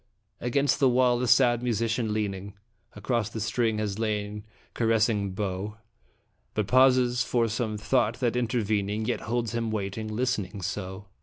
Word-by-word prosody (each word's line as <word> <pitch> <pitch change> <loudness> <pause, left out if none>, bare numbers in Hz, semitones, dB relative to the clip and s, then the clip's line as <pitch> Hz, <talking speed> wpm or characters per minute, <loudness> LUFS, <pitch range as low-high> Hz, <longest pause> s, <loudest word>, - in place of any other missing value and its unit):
Against 140 +5 +1
the 135 -3 +5
wall 125 -1 +3
a 125 - 0
sad 120 0 +4
musician 115 -1 0
leaning 100 -2 -3 0.4
Across 110 +1 -1
the 115 - -6
strings 110 0 0
has 105 -1 -3
lain 105 -1 -2 0.3
caressing 110 -3 +1
bow, 100 +1 -3 0.8
But 105 - +1
pauses 125 +1 +4
for 120 -2 +1
some 110 -1 -2
thought 115 +2 +1
that 120 -3 0
intervening 110 -3 0
Yet 120 - -1
holds 120 0 -2
him 115 -1 -1
waiting, 110 0 -3
listening 105 -4 -2
so. 95 +2 -5
110 Hz, 145 wpm, -27 LUFS, 105-120 Hz, 0.8 s, the